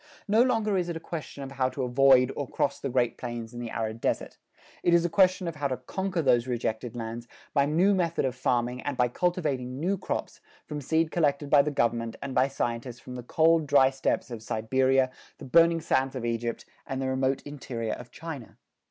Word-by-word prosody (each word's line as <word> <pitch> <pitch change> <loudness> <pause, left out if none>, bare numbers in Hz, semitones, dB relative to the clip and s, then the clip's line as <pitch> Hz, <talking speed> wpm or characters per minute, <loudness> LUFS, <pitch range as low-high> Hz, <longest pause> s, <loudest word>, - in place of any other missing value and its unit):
No 215 +3 +4
longer 225 -5 +2
is 175 -1 -2
it 170 - -3
a - - -7
question 155 -4 -7
of 135 - -7
how 130 -1 0
to 130 - -4
avoid 130 0 +5
or 145 - -3
cross - - -1
the 135 - -3
Great 120 -2 0
Plains 120 -1 -5
and 120 - -6
the 120 - -5
arid 110 0 -3
desert. - - -2 0.4
It 175 - +4
is 170 0 +3
a 175 - -1
question 185 -1 +3
of 165 -2 -4
how 145 -1 0
to 130 -2 -2
conquer 185 +7 -3
those 125 -2 +3
rejected 120 -1 -2
lands 115 0 -5 0.3
by 140 -1 +3
new 175 +7 +3
method 170 -6 0
of 130 - 0
farming 125 0 0
and 145 -3 -3
by 125 -1 +3
cultivating 135 -6 -1
new 185 +4 0
crops - - -4 0.2
from 150 -1 -5
seed 160 +3 +1
collected 145 -3 0
by 145 - +8
the 145 - -1
government 115 -4 0
and 140 -1 -5
by 130 +1 +3
scientists 120 -2 -3
from 125 - -10
the 125 - -5
cold, 160 +5 +3
dry 135 -2 +5
steppes 130 -2 -1
of 115 -2 -6
Siberia, 130 +4 +1 0.3
the - - -10
burning 165 +4 +5
sands 135 -4 0
of 125 -2 -3
Egypt, 115 0 -2 0.2
and 135 - -3
the 135 - -1
remote 130 +1 0
interior 125 -6 -4
of 125 - -9
China. 155 -7 -8
135 Hz, 215 wpm, -28 LUFS, 120-160 Hz, 0.4 s, by